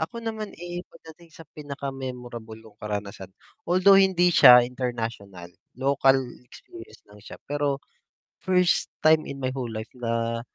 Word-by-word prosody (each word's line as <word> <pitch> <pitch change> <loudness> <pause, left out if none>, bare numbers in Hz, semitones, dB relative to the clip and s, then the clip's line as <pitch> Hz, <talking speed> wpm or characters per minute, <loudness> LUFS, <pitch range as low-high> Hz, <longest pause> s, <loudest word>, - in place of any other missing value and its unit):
Ako 165 +9 -4
naman, 220 -2 -5
eh, 175 +1 -7
pagdating 160 +1 -16
sa 165 - -13
pinaka-memorable 130 -6 -7
kong 110 -1 -18
karanasan, 100 -2 -6 0.4
although 185 +2 +5
hindi 180 -2 +3
siya 125 -5 +8
international, 115 -8 -6 0.2
local 135 0 +3 0.3
experience 350 - -14
lang 105 0 -17
siya, 105 - -11
pero 145 -1 -2 0.6
first 180 -1 +1
time 155 0 +4
in 135 -1 -8
my 130 - -1
whole 130 -3 -4
life 110 0 -7
na 115 -1 -2
135 Hz, 135 wpm, -25 LUFS, 115-165 Hz, 0.6 s, siya